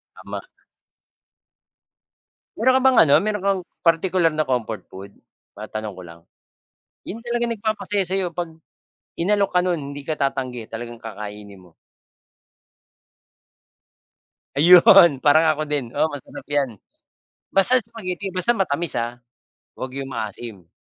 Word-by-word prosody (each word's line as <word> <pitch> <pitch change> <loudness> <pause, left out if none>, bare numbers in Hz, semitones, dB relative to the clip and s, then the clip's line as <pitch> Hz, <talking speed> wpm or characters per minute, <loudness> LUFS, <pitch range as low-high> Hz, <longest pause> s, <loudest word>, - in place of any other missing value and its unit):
Tama. - - -7 2.2
Mayro'n 260 0 +4
ka - - -3
bang, 260 -2 +4
ano, 140 - +5
mayro'n 210 -2 -2
kang, 195 -2 +1 0.2
partikular 165 0 +3
na 155 - +1
comfort 115 -4 -2
food? 100 +1 -10 0.4
Matanong 110 0 -6
ko 95 - -10
lang. 85 -1 -13 0.9
'Yong 225 +4 -7
talagang 240 0 -1
nagpapasaya 210 -2 -1
sa'yo 190 +1 0
'pag, 175 -1 -3 0.7
inalok 200 +2 +2
ka 180 - +4
no'n 180 -1 0 0.2
hindi 145 - -7
ka 155 +2 -4
tatanggi 130 -4 -2
talagang 120 +1 -7
kakainin 105 -3 -9
mo. 90 -2 -20 2.9
Ayun! 170 -2 +7
parang 155 +2 +5
ako 155 - -3
din, 135 -6 -2
oo, 160 - +1
masarap 145 -3 -9
'yan. 145 -3 +1 0.8
Basta 220 +7 +3
spaghetti, 200 -4 -6
basta 185 +6 +2
matamis, 175 -6 -1
ah, 120 +1 -4 0.6
huwag 130 +1 -7
'yong 135 -1 -5
maasim. 110 -4 -6
155 Hz, 125 wpm, -22 LUFS, 120-195 Hz, 2.9 s, Ayun